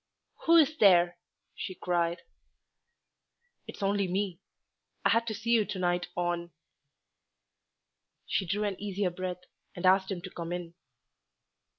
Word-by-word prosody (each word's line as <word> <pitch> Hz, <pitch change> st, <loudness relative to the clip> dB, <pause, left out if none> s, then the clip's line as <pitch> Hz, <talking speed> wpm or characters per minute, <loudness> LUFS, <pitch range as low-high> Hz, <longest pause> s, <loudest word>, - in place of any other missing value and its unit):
"Who 335 Hz, -, +7 dB
is 315 Hz, -1 st, +4 dB
there?" 175 Hz, -, +5 dB, 0.3 s
she 185 Hz, -, -6 dB
cried. 175 Hz, -1 st, -1 dB, 1.4 s
"It's -, -, -7 dB
only 200 Hz, 0 st, +1 dB
me. 185 Hz, -1 st, -2 dB, 0.7 s
I -, -, +6 dB
had 230 Hz, 0 st, +2 dB
to 220 Hz, -, -2 dB
see 225 Hz, +3 st, -3 dB
you 230 Hz, -2 st, +5 dB
to 200 Hz, -, -5 dB
night 175 Hz, -1 st, 0 dB
on 175 Hz, -1 st, -1 dB, 0.9 s
" -, -, -55 dB
She 190 Hz, -, -1 dB
drew 205 Hz, +4 st, 0 dB
an 200 Hz, -2 st, -3 dB
easier 200 Hz, -2 st, -1 dB
breath, 180 Hz, 0 st, -5 dB, 0.3 s
and 175 Hz, -, -4 dB
asked 190 Hz, +1 st, +4 dB
him 180 Hz, -3 st, -4 dB
to 185 Hz, -, -7 dB
come 170 Hz, 0 st, -6 dB
in. 175 Hz, -1 st, -5 dB
185 Hz, 145 wpm, -30 LUFS, 175-205 Hz, 1.4 s, Who